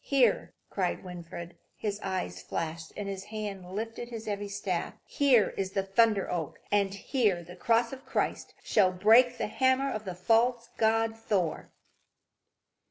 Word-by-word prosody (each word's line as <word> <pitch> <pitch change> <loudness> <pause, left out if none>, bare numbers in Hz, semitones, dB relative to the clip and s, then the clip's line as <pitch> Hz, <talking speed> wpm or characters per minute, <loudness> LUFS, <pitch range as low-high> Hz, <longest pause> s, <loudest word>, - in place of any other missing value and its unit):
"Here," 255 -6 +2 0.2
cried 185 -3 -1
Winfried, 175 -1 -8
as - - -28 0.2
his 205 -1 -3
eyes 140 - -3
flashed 160 0 -4
and 205 -1 -4
his 195 0 -5
hand 205 -4 -6
lifted 225 +4 -4
his 225 -2 -7
heavy 205 -1 -3
staff, 200 -3 -3
"here 255 -8 +4
is 195 -1 -2
the 195 -2 +1
Thunder 200 +1 +3
oak; 165 -5 -3
and 200 -1 +3
here 200 -3 0
the 175 +1 -11
cross 230 +4 +2
of 265 0 -9
Christ - - -2
shall 185 -2 +3
break 225 +7 +5
the - - -1
hammer 260 +4 +2
of 215 -2 -4
the 185 -2 -4
false 230 +5 +2
god 225 0 +2
Thor." 200 -7 -1
205 Hz, 160 wpm, -29 LUFS, 185-230 Hz, 0.2 s, break